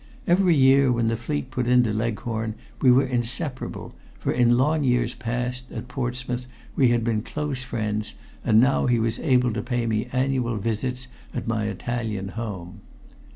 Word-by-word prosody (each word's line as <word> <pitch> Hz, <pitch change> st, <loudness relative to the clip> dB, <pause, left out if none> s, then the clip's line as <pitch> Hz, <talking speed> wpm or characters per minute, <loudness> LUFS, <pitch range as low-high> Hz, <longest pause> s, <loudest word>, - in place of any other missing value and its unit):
Each 175 Hz, +2 st, +4 dB
year 140 Hz, -7 st, +5 dB
when 120 Hz, -2 st, +1 dB
the 115 Hz, -, 0 dB
fleet 130 Hz, +3 st, -3 dB
put 125 Hz, -2 st, -1 dB
into 125 Hz, -3 st, +4 dB
Leghorn 110 Hz, 0 st, -2 dB, 0.3 s
we 130 Hz, -, +6 dB
were 130 Hz, +2 st, +5 dB
inseparable, 130 Hz, +3 st, -4 dB, 0.2 s
for -, -, -1 dB
in 120 Hz, -1 st, +4 dB
long 150 Hz, +4 st, +2 dB
years 125 Hz, -2 st, +2 dB
past, 125 Hz, +1 st, -4 dB
at 115 Hz, 0 st, -6 dB
Portsmouth, 125 Hz, -1 st, -3 dB, 0.3 s
we 130 Hz, -, +4 dB
had 120 Hz, -1 st, +2 dB
been 110 Hz, -2 st, 0 dB
close 140 Hz, +2 st, -3 dB
friends, 110 Hz, -3 st, -3 dB, 0.3 s
and 110 Hz, 0 st, +5 dB
now 130 Hz, +3 st, +3 dB
he 120 Hz, -1 st, +3 dB
was 115 Hz, 0 st, 0 dB
able 125 Hz, -5 st, +2 dB
to 110 Hz, -, -2 dB
pay 120 Hz, 0 st, -1 dB
me 110 Hz, +1 st, 0 dB
annual 130 Hz, -3 st, 0 dB
visits 125 Hz, +4 st, -2 dB, 0.3 s
at 120 Hz, -, -3 dB
my 110 Hz, -2 st, 0 dB
Italian 110 Hz, -1 st, -3 dB
home. 100 Hz, -5 st, -6 dB
120 Hz, 165 wpm, -24 LUFS, 115-130 Hz, 0.3 s, we